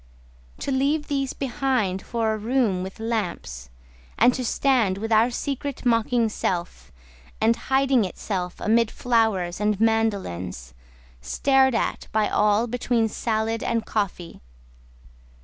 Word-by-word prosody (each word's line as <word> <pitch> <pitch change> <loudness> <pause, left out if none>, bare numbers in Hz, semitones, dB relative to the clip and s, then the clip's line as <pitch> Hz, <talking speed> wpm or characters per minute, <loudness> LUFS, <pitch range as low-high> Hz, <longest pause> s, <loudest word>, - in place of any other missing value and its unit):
To - - -2
leave 285 +3 0
these 275 -2 -1
behind 255 -8 -1
for 225 -2 -1
a - - -2
room 225 -4 +1
with 190 +3 -7
lamps: 180 - -3 0.5
And 245 +2 +5
to 255 - -3
stand 235 -6 +2
with 225 +3 -4
our 225 +2 +5
Secret 275 +2 -4
mocking 235 0 +2
itself, 180 -5 -3 0.5
And 225 +1 +3
hiding 265 -1 +2
itself 180 -1 -4
amid 230 +1 +2
flowers 220 -9 0
and 210 -1 0
mandolins, 190 - -1 0.5
Stared 265 - +2
at - - -2
by 215 -1 +2
all 210 +2 +2
between 240 -1 0
salad 220 0 -1
and 230 -1 -1
coffee. 190 -5 -3
225 Hz, 125 wpm, -24 LUFS, 200-250 Hz, 0.5 s, And